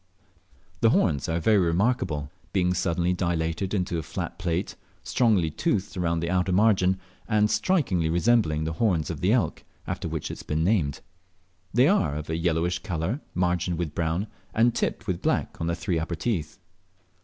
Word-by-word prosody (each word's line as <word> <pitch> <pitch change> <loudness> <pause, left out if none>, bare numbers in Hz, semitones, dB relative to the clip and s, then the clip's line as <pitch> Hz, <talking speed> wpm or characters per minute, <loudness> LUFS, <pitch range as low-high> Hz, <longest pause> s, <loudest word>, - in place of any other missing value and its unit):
The - - +5
horns 70 0 +2
are 80 +1 0
very 105 +5 +4
remarkable, 85 - 0 0.2
being 90 -2 +2
suddenly 90 0 0
dilated 85 0 -1
into 90 -4 -1
a - - -2
flat - - -5
plate, 90 +2 -2 0.3
strongly 105 -10 +2
toothed 105 - -1
round 85 -2 0
the 85 - -1
outer 90 0 +1
margin, 95 -2 +3 0.3
and 105 -1 +2
strikingly 100 - +1
resembling 85 -3 +2
the 80 +1 -2
horns 85 -3 +1
of - - -6
the - - +3
elk, - - +1 0.2
after - - -3
which - - -4
it - - -7
has - - -9
been 80 +1 -1
named. 85 -7 +1 0.7
They 125 +7 +4
are 155 - +2
of 75 +1 -5
a - - 0
yellowish 85 +1 0
colour, 95 - -3
margined 90 -1 0
with 80 -3 -3
brown, 85 +5 -1 0.3
and 115 +2 +4
tipped 110 - -2
with 90 -4 -2
black - - -1
on 85 - -1
the 85 - 0
three 85 -1 -1
upper 85 +2 -3
teeth. 85 -4 -2
90 Hz, 175 wpm, -26 LUFS, 80-100 Hz, 0.7 s, The